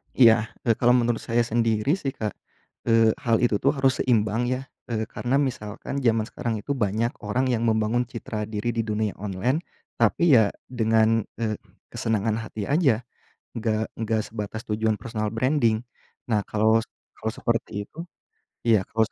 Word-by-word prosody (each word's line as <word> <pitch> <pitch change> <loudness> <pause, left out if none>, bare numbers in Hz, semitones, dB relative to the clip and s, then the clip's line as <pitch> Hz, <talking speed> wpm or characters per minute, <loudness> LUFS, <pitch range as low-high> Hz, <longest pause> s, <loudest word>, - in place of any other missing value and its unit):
Iya, 115 -3 +6 0.2
eee, 115 -2 +3
kalau 120 0 +5
menurut 120 -1 +2
saya 120 +1 +1
sendiri 115 +1 +1
sih, 135 -2 -3
Kak, 105 -2 -2 0.6
eee, 115 -1 +5
hal 115 -1 +4
itu 120 -3 +3
tuh 140 +2 +3
harus 135 -1 +2
seimbang 115 -1 +2
ya, 130 +1 -1 0.3
eee, 110 -2 -1
karena 125 +2 -1
misalkan 125 0 -3
zaman 115 -2 +3
sekarang 120 -3 -3
itu 140 - -4
banyak 115 -2 0
orang 125 +6 +1
yang 115 -1 0
membangun 110 +2 +2
citra 110 -3 -5
diri 110 +1 -2
di 115 - +2
dunia 105 -1 -1
online, 105 - -1 0.4
tapi 170 -6 +4
ya 110 -3 +3 0.2
dengan, 110 -2 +2 0.2
eee, 110 -2 0 0.3
kesenangan 110 0 0
hati 110 -2 -6
aja, 140 -7 +3 0.6
nggak 110 -1 0 0.2
nggak 110 -1 0
sebatas 110 0 -5
tujuan 110 0 +1
personal 110 -2 -3
branding. 115 -2 +2 0.5
Nah, 110 -3 +2
kalau 110 +1 +3
s - - -17 0.3
kalau 110 - -2
seperti 115 -4 -2
itu - - -25 0.7
iya, 110 -4 +5
kalau 110 0 +1
s - - -38
115 Hz, 165 wpm, -25 LUFS, 110-120 Hz, 0.7 s, Iya